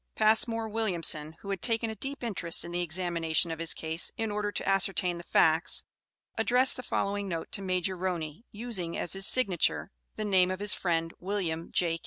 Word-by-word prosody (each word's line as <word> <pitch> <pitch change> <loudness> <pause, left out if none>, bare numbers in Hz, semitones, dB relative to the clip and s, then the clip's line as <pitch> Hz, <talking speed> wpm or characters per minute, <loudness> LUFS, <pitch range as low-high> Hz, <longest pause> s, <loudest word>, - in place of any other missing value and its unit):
Passmore 225 +1 +3
Williamson, 170 -8 0
who 200 - -5
had 195 - -3
taken 230 -1 +1
a - - -7
deep 270 +6 -6
interest 180 -8 0
in 170 - -7
the 175 0 -1
examination 170 -1 0
of 160 - -5
his 165 -1 +1
case, 160 +1 +1
in 225 -1 -2
order 205 0 -2
to - - -4
ascertain 190 -2 +2
the - - -9
facts, 160 -1 +3 0.6
addressed 250 +3 +4
the - - -6
following 200 -4 -2
note 165 -2 -4
to - - -1
Major 185 0 -1
Roney, 175 -1 -4
using 205 -6 -4
as 175 - 0
his 195 0 +4
signature 195 -5 +2 0.2
the 215 - -3
name 185 -3 +4
of 185 0 -3
his 205 -1 +1
friend, 165 -2 -1
Wm. 175 -4 -3
J. 165 -2 +1
185 Hz, 190 wpm, -29 LUFS, 170-210 Hz, 0.6 s, addressed